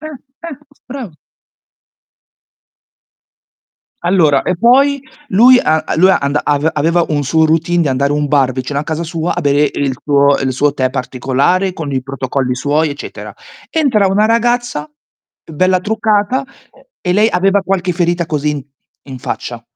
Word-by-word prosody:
Eh, 310 Hz, -, -8 dB, 0.4 s
eh 285 Hz, -5 st, -8 dB, 0.3 s
bravo. 245 Hz, -, -7 dB, 2.9 s
Allora, 165 Hz, -6 st, +3 dB
e 180 Hz, -, -1 dB
poi 270 Hz, +5 st, +3 dB, 0.3 s
lui 245 Hz, +6 st, +6 dB
a 155 Hz, 0 st, +1 dB
a -, -, -2 dB
lui 185 Hz, +3 st, +5 dB
anda 140 Hz, -4 st, +1 dB
ave 145 Hz, +2 st, +1 dB
aveva 165 Hz, +3 st, +1 dB
un 145 Hz, -2 st, 0 dB
suo 160 Hz, +4 st, +2 dB
routine 165 Hz, +2 st, +1 dB
di 155 Hz, -, 0 dB
andare 140 Hz, +2 st, 0 dB
un 150 Hz, 0 st, -1 dB
bar 135 Hz, -3 st, +2 dB
vicino 135 Hz, +2 st, -3 dB
a -, -, -3 dB
casa 160 Hz, +2 st, -3 dB
sua 165 Hz, +1 st, -3 dB
a -, -, -2 dB
bere 145 Hz, 0 st, +2 dB
il 140 Hz, -2 st, -1 dB
suo 140 Hz, -1 st, +3 dB
il 130 Hz, -1 st, -1 dB
suo 145 Hz, +2 st, +1 dB
tè 130 Hz, -2 st, 0 dB
particolare 135 Hz, +9 st, -1 dB
con 150 Hz, -5 st, -6 dB
i 130 Hz, -1 st, -1 dB
protocolli 130 Hz, -1 st, -3 dB
suoi, 150 Hz, +4 st, 0 dB
eccetera. 140 Hz, -, -9 dB, 0.4 s
Entra 250 Hz, -11 st, +2 dB
una 205 Hz, +3 st, +2 dB
ragazza, 235 Hz, -8 st, 0 dB, 0.6 s
bella 185 Hz, +4 st, +1 dB
truccata 220 Hz, +4 st, 0 dB, 0.6 s
e 180 Hz, -, -1 dB
lei 210 Hz, +2 st, +3 dB
aveva 195 Hz, +2 st, +2 dB
qualche 185 Hz, -1 st, -1 dB
ferita 175 Hz, 0 st, 0 dB
così 150 Hz, -1 st, -2 dB
in 145 Hz, -3 st, -5 dB, 0.4 s
in 135 Hz, -2 st, -9 dB
faccia. 120 Hz, -2 st, -5 dB
160 Hz, 155 wpm, -15 LUFS, 140-195 Hz, 2.9 s, lui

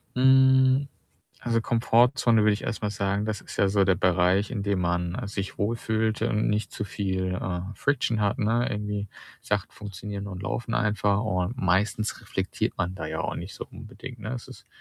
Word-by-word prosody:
Hm, 130 Hz, +1 st, +5 dB, 0.5 s
also, 115 Hz, -1 st, +1 dB
Komfortzone 115 Hz, 0 st, +3 dB
würde 105 Hz, 0 st, +5 dB
ich 105 Hz, -, -3 dB
erstmal 105 Hz, -2 st, -2 dB
sagen, 100 Hz, 0 st, -1 dB
das 110 Hz, -2 st, -2 dB
ist -, -, -10 dB
ja 100 Hz, -, +3 dB
so 100 Hz, 0 st, +3 dB
der 95 Hz, 0 st, +3 dB
Bereich, 90 Hz, +4 st, +2 dB
in 105 Hz, -5 st, -2 dB
dem 100 Hz, -2 st, 0 dB
man, 90 Hz, 0 st, 0 dB
äh, 125 Hz, -, -4 dB
sich 100 Hz, -1 st, -5 dB
wohl 105 Hz, +3 st, +1 dB
fühlt 110 Hz, -1 st, -1 dB
und 105 Hz, +1 st, +1 dB
nicht 105 Hz, +1 st, -1 dB
zu 105 Hz, -, -4 dB
viel, 95 Hz, -2 st, -2 dB
äh, 90 Hz, -1 st, -2 dB
Friction 125 Hz, -5 st, 0 dB
hat, 100 Hz, -1 st, +1 dB
ne? 115 Hz, +3 st, +1 dB
Irgendwie 105 Hz, -1 st, -3 dB, 0.3 s
Sachen -, -, -1 dB
funktionieren 100 Hz, 0 st, -6 dB
und 95 Hz, -1 st, -7 dB
laufen 115 Hz, +2 st, -2 dB
einfach, 105 Hz, -1 st, +2 dB
und 95 Hz, +2 st, -1 dB
meistens 100 Hz, +3 st, +1 dB
reflektiert -, -, -2 dB
man 90 Hz, +2 st, -1 dB
da 80 Hz, -3 st, -5 dB
ja 80 Hz, 0 st, -3 dB
auch -, -, -2 dB
nicht -, -, -7 dB
so -, -, -7 dB
unbedingt, 125 Hz, -3 st, -10 dB
ne? 110 Hz, +3 st, -5 dB
Es 120 Hz, -, -7 dB
ist -, -, -13 dB
105 Hz, 190 wpm, -26 LUFS, 95-115 Hz, 0.5 s, Hm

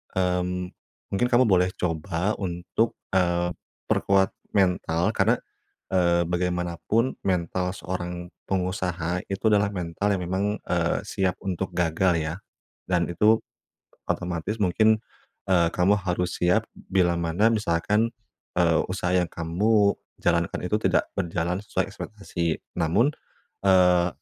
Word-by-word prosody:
mmm, 90 Hz, 0 st, 0 dB, 0.4 s
mungkin 100 Hz, +5 st, +2 dB
kamu 125 Hz, 0 st, +4 dB
boleh 95 Hz, -6 st, +4 dB
coba 85 Hz, +3 st, -1 dB
untuk, 90 Hz, +4 st, -1 dB, 0.2 s
eee, 90 Hz, -1 st, +2 dB, 0.4 s
perkuat 95 Hz, -1 st, +3 dB, 0.2 s
mental. 90 Hz, -3 st, +2 dB
Karena, -, -, +3 dB, 0.6 s
eee, 85 Hz, -2 st, +3 dB
bagaimanapun 90 Hz, +7 st, -1 dB
mental 90 Hz, 0 st, 0 dB
seorang 90 Hz, -2 st, -5 dB, 0.2 s
pengusaha 90 Hz, -2 st, -1 dB
itu 100 Hz, +3 st, 0 dB
adalah 105 Hz, 0 st, +4 dB
mental 90 Hz, +2 st, -2 dB
yang 90 Hz, -, -3 dB
memang, 95 Hz, +3 st, -1 dB, 0.2 s
eee, 85 Hz, -1 st, 0 dB
siap 95 Hz, -3 st, -1 dB
untuk 95 Hz, -1 st, -3 dB
gagal 90 Hz, +1 st, +2 dB
ya, 80 Hz, +1 st, -3 dB, 0.5 s
dan 90 Hz, -2 st, +2 dB
itu 105 Hz, +6 st, +4 dB, 0.7 s
otomatis 90 Hz, +4 st, -2 dB
mungkin, 110 Hz, +4 st, +4 dB, 0.5 s
eee, 85 Hz, -3 st, +4 dB
kamu 90 Hz, +3 st, +4 dB
harus 90 Hz, -2 st, -2 dB
siap, 90 Hz, +6 st, +3 dB
bilamana 85 Hz, +1 st, +1 dB
misalkan, 105 Hz, +2 st, +1 dB, 0.5 s
eee, 85 Hz, -2 st, +4 dB
usaha 90 Hz, -1 st, -1 dB
yang 90 Hz, -1 st, +3 dB
kamu 100 Hz, +5 st, +2 dB, 0.3 s
jalankan 85 Hz, -1 st, +1 dB
itu 100 Hz, +4 st, +1 dB
tidak -, -, +2 dB
berjalan 85 Hz, +2 st, -1 dB
sesuai -, -, -1 dB
ekspektasi. 85 Hz, -6 st, -3 dB, 0.2 s
Namun, 100 Hz, -, +3 dB, 0.5 s
eee, 90 Hz, -2 st, +5 dB
90 Hz, 115 wpm, -25 LUFS, 85-95 Hz, 0.7 s, eee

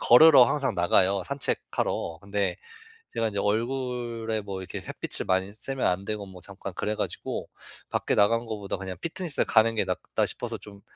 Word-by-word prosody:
걸으러 135 Hz, +2 st, +9 dB
항상 135 Hz, -1 st, 0 dB
나가요, 95 Hz, +2 st, +3 dB
산책하러. 140 Hz, -10 st, -2 dB
근데 100 Hz, -2 st, -1 dB, 0.6 s
제가 115 Hz, -, +1 dB
인제 100 Hz, -1 st, -2 dB
얼굴에 115 Hz, 0 st, -1 dB
뭐 100 Hz, -2 st, -5 dB
이렇게 -, -, -5 dB
햇빛을 -, -, -3 dB
많이 95 Hz, +1 st, +1 dB
쐬면 135 Hz, +5 st, -3 dB
안 90 Hz, +2 st, +1 dB
되고 105 Hz, 0 st, -4 dB
뭐 95 Hz, -2 st, -12 dB
잠깐 100 Hz, -1 st, -8 dB
그래 105 Hz, -, -1 dB
가지고 -, -, -3 dB, 0.4 s
'밖에 -, -, 0 dB
나간 115 Hz, +3 st, +3 dB
것보다 105 Hz, -3 st, -4 dB
그냥 95 Hz, -1 st, -5 dB
피트니스를 170 Hz, -2 st, -1 dB
가는 115 Hz, 0 st, +4 dB
게 -, -, +2 dB
낫다.' -, -, -1 dB
싶어서 -, -, -5 dB
좀 100 Hz, -1 st, -13 dB
105 Hz, 360 characters per minute, -27 LUFS, 100-120 Hz, 0.6 s, 걸으러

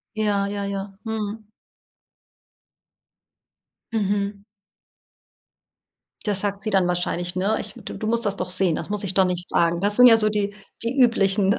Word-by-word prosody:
Ja, 205 Hz, -2 st, +1 dB
ja, 200 Hz, 0 st, -3 dB
ja. 195 Hz, 0 st, -5 dB
Mhm. 215 Hz, -1 st, -4 dB, 2.4 s
Mhm. 200 Hz, -1 st, -1 dB, 1.8 s
Das 205 Hz, -3 st, +1 dB
sagt 200 Hz, -1 st, -2 dB
sie 215 Hz, -, -2 dB
dann 190 Hz, -3 st, +2 dB
wahrscheinlich, 175 Hz, 0 st, -2 dB
ne? 195 Hz, +4 st, +1 dB
Ich 200 Hz, -1 st, -4 dB
„Du -, -, -8 dB
du 215 Hz, -, -5 dB
musst 235 Hz, 0 st, +1 dB
das 200 Hz, -1 st, -1 dB
doch 180 Hz, -, -3 dB
sehen, 180 Hz, -3 st, +2 dB
das -, -, -5 dB
muss 210 Hz, -1 st, -1 dB
ich 190 Hz, -1 st, -3 dB
doch 190 Hz, -, +5 dB
nicht 180 Hz, -1 st, -3 dB
fragen.“ 170 Hz, +1 st, +1 dB
Das 205 Hz, +1 st, +1 dB
sind 250 Hz, -, +7 dB
ja 225 Hz, -1 st, +7 dB
so 215 Hz, -1 st, +4 dB
die 205 Hz, -1 st, -1 dB, 0.3 s
die 235 Hz, +4 st, -2 dB
üblichen 200 Hz, -4 st, +3 dB
200 Hz, 160 wpm, -23 LUFS, 190-215 Hz, 2.4 s, sind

